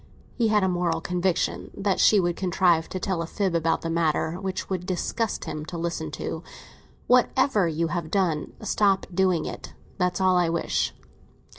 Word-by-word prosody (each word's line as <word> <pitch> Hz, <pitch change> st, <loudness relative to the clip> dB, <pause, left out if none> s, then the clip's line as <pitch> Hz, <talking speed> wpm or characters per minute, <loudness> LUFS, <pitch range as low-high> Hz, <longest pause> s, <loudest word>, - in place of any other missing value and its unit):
He 235 Hz, -2 st, +1 dB
had 210 Hz, -2 st, +3 dB
a -, -, +3 dB
moral 175 Hz, -2 st, 0 dB
conviction 180 Hz, +1 st, -1 dB
that 195 Hz, -1 st, 0 dB
she 210 Hz, -, +6 dB
would 175 Hz, -2 st, 0 dB
contrive 175 Hz, -3 st, +2 dB
to 185 Hz, -, -4 dB
tell 185 Hz, -2 st, -1 dB
a 165 Hz, -, -4 dB
fib 195 Hz, 0 st, -1 dB
about 165 Hz, -1 st, +1 dB
the 165 Hz, -, -2 dB
matter, 165 Hz, 0 st, 0 dB
which 190 Hz, -1 st, -3 dB
it -, -, -22 dB
would 180 Hz, -1 st, -2 dB
disgust 200 Hz, +4 st, -2 dB
him 150 Hz, -, -5 dB
to 170 Hz, +2 st, -6 dB
listen 165 Hz, -2 st, -3 dB
to. 160 Hz, -, -4 dB, 0.6 s
"Whatever 250 Hz, -5 st, +3 dB
you 165 Hz, +1 st, -1 dB
have 170 Hz, -1 st, -3 dB
done, 175 Hz, -5 st, 0 dB
stop 200 Hz, -2 st, +2 dB
doing 185 Hz, -3 st, +2 dB
it. -, -, -7 dB, 0.2 s
That's 180 Hz, 0 st, +1 dB
all 185 Hz, -1 st, +4 dB
I 175 Hz, -2 st, +2 dB
wish." 170 Hz, 0 st, -1 dB
180 Hz, 180 wpm, -25 LUFS, 165-190 Hz, 0.6 s, she